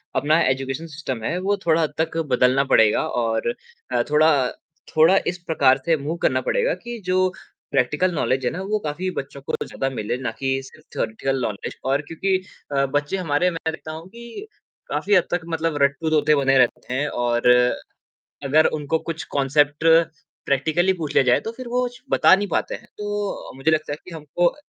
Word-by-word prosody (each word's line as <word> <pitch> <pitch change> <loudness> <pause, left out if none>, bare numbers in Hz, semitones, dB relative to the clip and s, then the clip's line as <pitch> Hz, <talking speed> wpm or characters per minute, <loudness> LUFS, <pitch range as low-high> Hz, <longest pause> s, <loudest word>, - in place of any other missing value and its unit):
अपना 155 +5 +3
education 135 +4 -2
system 130 -7 -5
है 170 - -1
वो 205 0 +2
थोड़ा 165 0 +3
हद 150 -2 -1
तक 160 0 -1 0.2
बदलना 125 +2 +4
पड़ेगा 110 -1 +4 0.2
और 115 - 0 0.4
अ, - - +2
थोड़ा 155 +1 +5 0.2
अ, - - -5 0.4
थोड़ा 165 +5 +6 0.2
इस - - -10
प्रकार 135 -4 +3
से 165 -2 +3
मूव 150 +4 -4
करना 130 0 +2
पड़ेगा - - +1
कि 240 -1 -6
जो 185 0 +2 0.4
प्रैक्टिकल 150 +7 +1
नॉलेज 130 -3 0
है - - +1
ना 185 - -5
वो 215 - +2
काफ़ी 170 +5 -2
बच्चों 140 0 -13
को - - -6
ज़्यादा 135 - -3
मिले 110 +2 -2
ना - - -1
कि 135 -1 -1 0.2
सिर्फ़ 155 - -17
थॉरीटिकल 130 +4 -1
नॉलेज 105 -4 -4 0.2
और 140 - +1
क्योंकि 190 +4 0 0.4
अ, 135 - +3
बच्चे 145 +6 -1
हमारे 175 -1 +1
मैं 160 - -2
देखता 155 0 -8
हूँ 165 - -13
कि 235 - -10 0.4
काफ़ी 205 +1 +1
हद 180 - +5
तक 175 0 0
मतलब 160 -2 -1
रट्टू 140 +3 +1
तोते 150 -1 +3
बने 135 0 +4
रहते 125 0 +1
हैं 140 +3 0 0.2
और 120 0 +2 1.0
अगर 155 +3 +4
उनको 150 +2 -1
कुछ 160 -1 -3
कॉन्सेप्ट 145 +2 +2 0.6
प्रैक्टिकली 160 +7 +2
पूछ 160 -5 -5
लिया - - +6
जाए 125 -1 +4
तो 225 - -5
फिर 255 -2 -7
वो 250 0 +2
श 245 - -15
बता - - +6
नहीं 205 0 -3
पाते - - -1
हैं। - - -10
तो 205 -1 -4
मुझे 135 +4 +1
लगता 155 -1 0
है 150 - -5
कि - - -11
हमको 165 +3 0
155 Hz, 190 wpm, -22 LUFS, 135-175 Hz, 1.0 s, थोड़ा